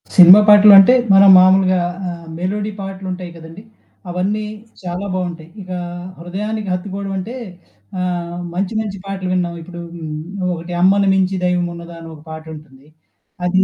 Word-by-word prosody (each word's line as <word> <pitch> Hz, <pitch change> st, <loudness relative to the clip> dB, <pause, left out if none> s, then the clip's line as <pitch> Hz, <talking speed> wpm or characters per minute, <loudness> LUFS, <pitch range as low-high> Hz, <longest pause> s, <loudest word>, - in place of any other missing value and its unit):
Cinema 180 Hz, +2 st, +9 dB
పాటలు 210 Hz, 0 st, +8 dB
అంటే 195 Hz, +6 st, +7 dB, 0.2 s
మనం 195 Hz, 0 st, +7 dB
మామూలుగా 185 Hz, 0 st, +4 dB, 0.3 s
ఆహ్, 170 Hz, -1 st, -9 dB
మెలోడి 200 Hz, +4 st, -3 dB
పాటలుంటాయి 190 Hz, -2 st, -7 dB
కదండీ! 165 Hz, +5 st, -12 dB, 0.5 s
అవన్నీ 195 Hz, +4 st, -2 dB, 0.4 s
చాలా 180 Hz, +2 st, -5 dB
బావుంటాయి. 175 Hz, -3 st, -5 dB
ఇగా, 185 Hz, -1 st, -6 dB, 0.4 s
హృదయానికి 205 Hz, +4 st, -5 dB
హత్తుకోవడమంటే, 195 Hz, +3 st, -5 dB, 0.7 s
ఆహ్, 175 Hz, -1 st, -4 dB
మంచి 190 Hz, +3 st, -3 dB
మంచి 200 Hz, -2 st, -6 dB
పాటలు 190 Hz, -2 st, -4 dB
విండం 175 Hz, -2 st, -2 dB
ఇప్పుడు 175 Hz, +1 st, -10 dB
హ్మ్. 160 Hz, -2 st, -7 dB, 0.2 s
నువ్వొకటి 175 Hz, -1 st, -4 dB
'అమ్మని 195 Hz, +2 st, +3 dB
మించి 190 Hz, 0 st, 0 dB
దైవం 180 Hz, -1 st, 0 dB
ఉన్నదా' 170 Hz, 0 st, -11 dB
అని 165 Hz, -, -10 dB
ఒక 150 Hz, -, -15 dB
పాట 160 Hz, 0 st, -8 dB
ఉంటుంది. 145 Hz, -2 st, -16 dB, 0.6 s
అది 185 Hz, +1 st, +2 dB
185 Hz, 140 wpm, -17 LUFS, 175-195 Hz, 0.7 s, Cinema